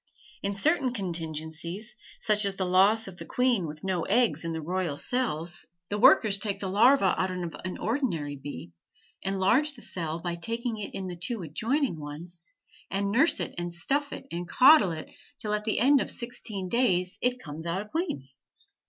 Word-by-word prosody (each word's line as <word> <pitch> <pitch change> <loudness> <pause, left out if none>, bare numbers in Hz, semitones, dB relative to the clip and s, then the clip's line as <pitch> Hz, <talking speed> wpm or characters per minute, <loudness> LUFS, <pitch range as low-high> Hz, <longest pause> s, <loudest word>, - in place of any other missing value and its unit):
In 200 0 -1
certain 270 - +2
contingencies, 170 +1 -4 0.2
such 210 -1 +3
as 200 -1 -1
the 190 - -1
loss 195 +5 +4
of 185 -2 -9
the - - -8
queen 245 -8 +1
with 155 0 -9
no 190 -3 0
eggs 235 0 +2
in 165 - -3
the 160 - -3
royal 170 -2 -2
cells, 175 - 0 0.2
the 205 - -2
workers 205 -1 +6
take 200 -1 -2
the 195 - -3
larva 225 0 +5
of 185 - 0 0.3
an 185 0 -4
ordinary 195 - -1
bee, 135 -10 -8 0.5
enlarge 200 +10 +2
the 235 - -11
cell 165 -2 -3
by 175 0 -3
taking 230 +5 -3
in 195 -2 -5
the 180 -1 -5
two 195 +4 -3
adjoining 220 - -1
ones, 160 +4 -9 0.5
and 200 +1 -1
nurse 270 +10 +3
it - - -2
and 175 0 -3
stuff 280 +12 -1
it - - -7
and 175 0 -5
coddle 260 - +7
it, 160 -1 -6 0.3
till 210 -1 -2
at 210 0 -1
the 220 - 0
end 270 +3 +5
of - - -3
sixteen 230 -6 -4
days 185 -5 +1
it 250 0 +1
comes 160 -1 -7
out 185 +5 -2
a - - -17
queen. 315 - -3
195 Hz, 180 wpm, -28 LUFS, 170-235 Hz, 0.5 s, coddle